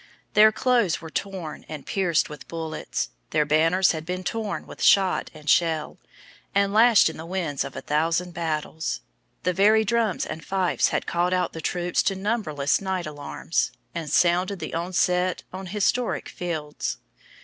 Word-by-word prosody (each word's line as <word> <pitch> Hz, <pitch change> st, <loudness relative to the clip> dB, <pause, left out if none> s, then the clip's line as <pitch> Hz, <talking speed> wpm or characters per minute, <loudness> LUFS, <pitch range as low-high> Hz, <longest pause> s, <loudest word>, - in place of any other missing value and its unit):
Their 215 Hz, +1 st, +7 dB
clothes 235 Hz, -6 st, +2 dB
were 160 Hz, -1 st, -10 dB
worn 185 Hz, -6 st, -7 dB
and 150 Hz, -3 st, -7 dB
pierced 180 Hz, -5 st, +1 dB
with 150 Hz, -4 st, -10 dB
bullets; 160 Hz, -, -4 dB, 0.2 s
their 150 Hz, -, +2 dB
banners 165 Hz, +5 st, +3 dB
had 160 Hz, -2 st, -4 dB
been 180 Hz, +2 st, -4 dB
torn 215 Hz, +2 st, -3 dB
with -, -, -11 dB
shot 190 Hz, -2 st, +4 dB
and 150 Hz, -1 st, -14 dB
shell, 160 Hz, -1 st, +2 dB, 0.6 s
and 200 Hz, 0 st, +2 dB
lashed 225 Hz, 0 st, +6 dB
in 160 Hz, -, -4 dB
the 160 Hz, -, -7 dB
winds 170 Hz, -6 st, -2 dB
of -, -, -8 dB
a -, -, -5 dB
thousand 165 Hz, +4 st, 0 dB
battles; 160 Hz, -, -3 dB, 0.4 s
the 180 Hz, -, +1 dB
very 215 Hz, +4 st, +4 dB
drums 225 Hz, -3 st, +1 dB
and 160 Hz, -, -6 dB
fifes 190 Hz, 0 st, +1 dB
had -, -, -1 dB
called 175 Hz, +1 st, 0 dB
out 180 Hz, -1 st, 0 dB
the 160 Hz, -, -6 dB
troops 175 Hz, +2 st, 0 dB
to 195 Hz, -, 0 dB
numberless 190 Hz, -9 st, 0 dB
night 190 Hz, -2 st, -2 dB
alarms, 150 Hz, +2 st, -2 dB, 0.2 s
and 165 Hz, -3 st, -4 dB
sounded 180 Hz, +4 st, +2 dB
the 160 Hz, -2 st, -6 dB
onset 180 Hz, +1 st, 0 dB
on 190 Hz, 0 st, -6 dB
historic 210 Hz, +5 st, 0 dB
fields. 155 Hz, -4 st, -4 dB
175 Hz, 160 wpm, -25 LUFS, 160-195 Hz, 0.6 s, Their